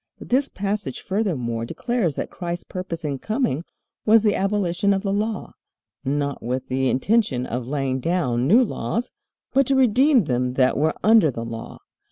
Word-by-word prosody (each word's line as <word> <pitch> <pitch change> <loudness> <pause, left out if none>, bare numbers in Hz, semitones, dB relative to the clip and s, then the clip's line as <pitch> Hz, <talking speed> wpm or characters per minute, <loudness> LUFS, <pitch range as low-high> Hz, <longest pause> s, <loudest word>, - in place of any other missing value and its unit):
This 265 +3 0
passage 200 -8 -3
furthermore 145 - -2
declares 195 - -1
that - - -4
Christ's 175 -1 -4
purpose 170 -3 -6
in 140 -2 -2
coming 215 - -1 0.4
was 220 0 +5
the 210 -2 +3
abolition 195 -1 +1
of 195 - -3
the 195 -1 0
Law, 210 0 -2 0.5
not 140 +1 -1
with 125 +2 -3
the 130 0 +1
intention 135 - +1
of 120 0 -4
laying 135 -2 -1
down 130 -6 0
new 230 - +6
laws, 235 0 -3 0.4
but 270 -1 +3
"to 275 - +2
redeem 260 0 +4
them 125 -3 -1
that 130 -1 +3
were 155 +3 +1
under 220 -7 +6
the 115 -3 -5
law." 115 0 -7
175 Hz, 165 wpm, -23 LUFS, 130-215 Hz, 0.5 s, new